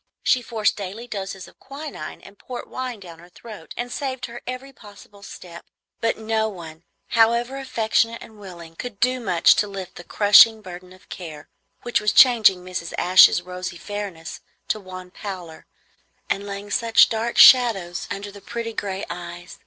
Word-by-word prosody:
She 255 - +3
forced 225 -3 0
daily 205 +4 -7
doses 195 -3 -6
of - - -20
quinine 275 - -9
and 195 - -15
port 250 -1 -8
wine 255 -3 -6
down 170 -4 -12
her 175 +1 -16
throat, 210 -2 -12
and 245 0 -4
saved 260 -2 -4
her 235 +1 -10
every 255 +2 -7
possible 205 -2 -16
step. 170 -3 -11 0.4
But 230 - 0
no 220 0 -1
one, 165 -5 -10 0.3
however 235 +3 +2
affectionate 230 -3 0
and 220 -1 -14
willing, 170 -4 -11
could 215 +1 -8
do 255 +1 +1
much 180 -8 +4
to 210 - +1
lift 195 -2 -8
the 175 - -9
crushing 215 +3 +6
burden 180 -1 -10
of 185 0 -18
care, 155 -5 -9 0.3
which 240 -3 0
was 210 -1 +1
changing 215 -8 +5
Mrs. 180 -2 -6
Ashe's 180 -1 +6
rosy 180 -1 -7
fairness 200 -5 -7 0.3
to 215 - 0
wan 185 -2 -10
pallor 180 -6 -9 0.6
and 200 +1 -2
laying 200 +1 -7
such 230 +1 +4
dark 225 +1 -3
shadows 210 -9 +6
under 200 +1 -6
the 200 0 -13
pretty 230 +3 -5
gray 195 -2 -4
eyes. 175 0 -9
205 Hz, 170 wpm, -22 LUFS, 180-230 Hz, 0.6 s, crushing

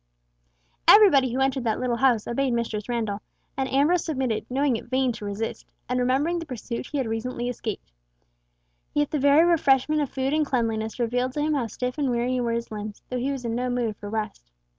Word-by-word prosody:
Everybody 290 - +7
who 260 +2 -1
entered 265 -1 +1
that 220 -2 0
little 245 -2 0
house 245 -4 +3
obeyed 260 +1 0
Mistress 230 -2 -2
Randall, 220 -4 -2 0.3
and 265 -1 -1
Ambrose 300 +6 +3
submitted, 260 -8 -2
knowing 270 0 +1
it - - -5
vain 260 0 +2
to 220 -2 -7
resist, 205 +2 -4 0.2
and 250 0 0
remembering 275 +8 +1
the 330 - -6
pursuit 245 -2 -5
he 295 - -4
had 265 - 0
recently 240 +2 -3
escaped; 220 - -5 1.0
yet 295 -1 +1
the 300 - 0
very 285 +4 +5
refreshment 305 -3 +3
of 285 - -1
food 265 +1 -1
and 310 0 +3
cleanliness 225 -5 -1
revealed 250 +1 0
to 295 - -2
him 305 +1 +1
how 265 -6 0
stiff 250 +5 -4
and 280 -3 +1
weary 245 +1 0
were 235 -1 0
his 235 0 -3
limbs, 210 -1 -7
though 250 - -2
he 265 +3 -1
was 265 -3 -5
in 230 - -1
no 250 +2 -1
mood 240 -3 -1
for 205 0 -8
rest. 210 - -4
250 Hz, 205 wpm, -25 LUFS, 230-275 Hz, 1.0 s, Everybody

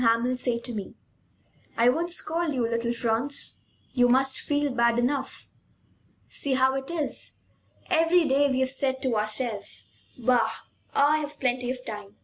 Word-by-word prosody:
Hamel 230 +2 +3
say 250 -1 -1
to 240 +1 -6
me: 205 -3 -6 0.8
"I 235 +1 +5
won't 330 +7 0
scold 335 -3 -1
you, 240 -3 +1
little 230 0 -1
Franz; 235 +4 -1 0.3
you 245 -1 +3
must 265 +1 +3
feel 290 -1 0
bad 235 -1 +3
enough. 265 +2 -1 0.8
See 275 -2 0
how 260 0 +3
it 270 0 -4
is! 320 -4 -2 0.5
Every 330 -1 +4
day 280 +1 +3
we 260 -1 +1
have 260 0 +2
said 265 -1 -1
to 255 -3 +1
ourselves: 215 0 -2 0.3
'Bah! 250 -1 +2 0.4
I've 295 +1 +2
plenty 250 -1 0
of 255 0 -4
time. 210 -2 -7
255 Hz, 150 wpm, -26 LUFS, 235-285 Hz, 0.8 s, I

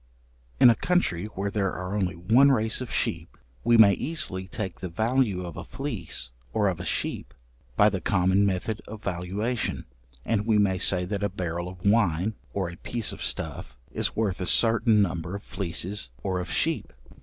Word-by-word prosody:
In 120 - +9
a - - +2
country 110 - 0
where 100 -1 -4
there 100 -2 0
are 90 +2 -4
only 95 -4 -1
one 115 +11 +5
race 110 -2 0
of 125 - -6
sheep, 85 0 -2 0.3
we 120 - +5
may 105 -3 +8
easily 95 - -2
take 95 -2 -5
the 95 - -5
value 110 -1 0
of 85 -3 -7
a - - -6
fleece - - -3 0.2
or 105 -2 +2
of 90 -2 -3
a - - -5
sheep - - -2 0.4
by 105 - +6
the 95 -3 0
common 95 +2 +2
method 100 +2 -1
of 110 0 -9
valuation, 100 +6 -2 0.4
and 110 -1 0
we 110 -2 +4
may 95 -3 +2
say 90 -1 +3
that 100 +2 -3
a 100 - +1
barrel 85 -2 -4
of 90 0 -12
wine, 100 -2 +2 0.2
or 95 -3 -2
a 85 0 -8
piece 120 +3 -2
of - - -10
stuff, 70 -2 -3
is - - -1
worth 100 -4 -1
a 90 - -2
certain 115 -2 +4
number 85 0 -3
of 100 - -7
fleeces 95 -3 -2
or 95 -2 -1
of 90 - -5
sheep. - - 0
100 Hz, 190 wpm, -26 LUFS, 90-110 Hz, 0.4 s, In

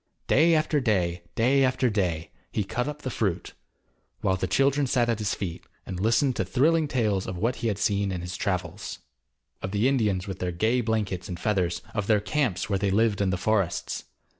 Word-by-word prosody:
Day 165 +3 +5
after 155 -1 +2
day, 90 -9 0
day 135 +4 +4
after 130 0 +2
day, 90 -7 -1 0.2
he 105 - 0
cut 125 +6 -2
up 150 0 -6
the 130 - -3
fruit, 95 -7 -2 0.7
while 95 - +2
the 95 0 -2
children 135 +8 +2
sat 125 -3 +2
at 115 -2 0
his 105 -2 -1
feet, 90 -5 -5 0.2
and 90 - -5
listened 115 +6 +2
to - - +1
thrilling 155 +4 +2
tales 105 -8 0
of 95 - -4
what 115 +7 0
he 115 - -2
had 105 -3 0
seen 100 -1 +1
in 90 -2 -3
his 90 +1 -5
travels. 90 -4 -3 0.6
Of 95 - -3
the 105 +5 +2
Indians 105 -9 +1
with 95 -1 -5
their 90 -1 -1
gay 110 +8 +1
blankets 105 -5 -1
and 90 -2 -5
feathers, 90 -5 0
of 105 -3 -2
their 105 -2 +4
camps 125 +2 -1
where 100 -2 0
they 100 0 +1
lived 105 0 +2
in 100 - +2
the 95 - 0
forests. 100 -3 -1
105 Hz, 205 wpm, -26 LUFS, 95-125 Hz, 0.7 s, Day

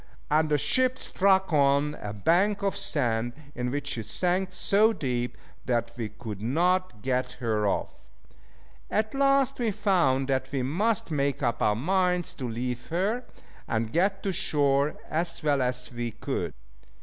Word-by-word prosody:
and 155 +1 +3
the 150 - +3
ship 255 - +2
struck 190 -2 +2
on 140 0 +3
a 105 - -4
bank 180 - +2
of 195 - 0
sand, 120 - 0 0.2
in 125 0 -2
which 145 +2 -3
she 125 -5 -2
sank 180 - -1
so 205 +4 +3
deep 125 - -2 0.3
that 120 -1 0
we 115 -3 -4
could 105 -4 -8
not 170 - +1
get 125 -1 0
her 110 -4 0
off. - - 0 1.0
At 215 0 0
last 275 -1 +3
we 235 -2 +1
found 170 -11 +2
that 130 0 0
we 135 -3 -1
must 190 - 0
make 140 -1 0
up 120 -3 0
our 105 - +3
minds 180 - +1
to 125 -2 -3
leave 120 +1 -4
her, 205 +9 -1 0.4
and 110 0 -1
get 195 +4 +1
to 195 - -1
shore 140 -2 +2
as 165 +1 -2
well 145 -3 +2
as 125 0 -2
we 120 0 -3
could. 110 - -3
145 Hz, 160 wpm, -27 LUFS, 125-190 Hz, 1.0 s, and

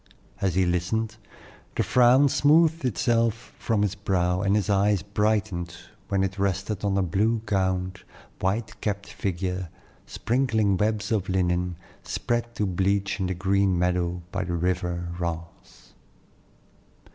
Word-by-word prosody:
As 95 -4 +1
he 95 0 +3
listened, 110 +6 -1 0.6
the - - +1
frown 125 +3 +5
smoothed 160 +3 +3
itself 115 0 0
from 110 -3 +1
his 105 -2 0
brow, 90 -2 0
and 100 0 +2
his 105 -1 +1
eye 100 0 +3 0.2
brightened 105 -5 0 0.3
when 100 -2 +1
it 95 +1 -3
rested 100 +1 -1
on 100 -1 +1
a 100 - +2
blue 110 +6 +1
gowned, 95 -2 -1 0.4
white 105 +4 -2
capped 100 -1 -2
figure, 95 -1 -3 0.4
sprinkling 115 -5 +1
webs 105 +2 0
of 100 -4 0
linen, 90 -1 0 0.3
spread 120 0 -2
to 105 - 0
bleach 100 +2 0
in 95 - 0
the 95 - -2
green 95 0 +2
meadow 90 0 0
by - - -2
the 85 - -3
river 90 0 -1
Rance. 85 -1 -7
100 Hz, 135 wpm, -26 LUFS, 90-110 Hz, 0.6 s, frown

